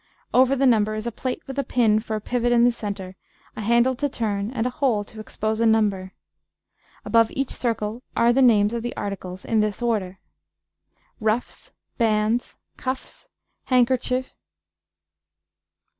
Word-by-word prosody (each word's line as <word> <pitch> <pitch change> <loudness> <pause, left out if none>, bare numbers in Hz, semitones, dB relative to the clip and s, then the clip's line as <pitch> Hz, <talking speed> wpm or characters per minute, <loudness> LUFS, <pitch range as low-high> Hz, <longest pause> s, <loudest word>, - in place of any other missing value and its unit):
Over 260 +1 +5
the 275 +1 +2
number 215 -4 +3
is 215 +1 -5
a 235 - -2
plate 255 +3 -4
with 270 +1 -5
a - - +1
pin 230 -4 +2
for 220 -1 -3
pivot 240 +2 -1
in 235 -1 +5
the 245 - +5
centre, 200 -5 -6 0.4
a - - -5
handle 235 +4 +3
to 285 +2 0
turn, 210 -4 -2
and 240 -2 -2
a 250 - 0
hole 245 -6 +1
to 215 +1 -13
expose 215 +1 -3
a - - +3
number. 200 -4 +1 0.9
Above 230 -1 +4
each 270 -1 -1
circle 225 -1 -2 0.2
are 235 +1 +4
the 270 - +3
names 215 -4 +4
of 235 - -2
the 240 +1 -5
articles 185 -2 -5
in 225 - +1
this 210 -1 0
order: 210 -6 -1 1.0
Ruffs. 220 +2 -2 0.3
Bandes. 220 +1 +1 0.2
Cuffes. 260 0 -6 0.4
Handkercher. 255 0 +2
230 Hz, 155 wpm, -23 LUFS, 210-245 Hz, 1.0 s, Over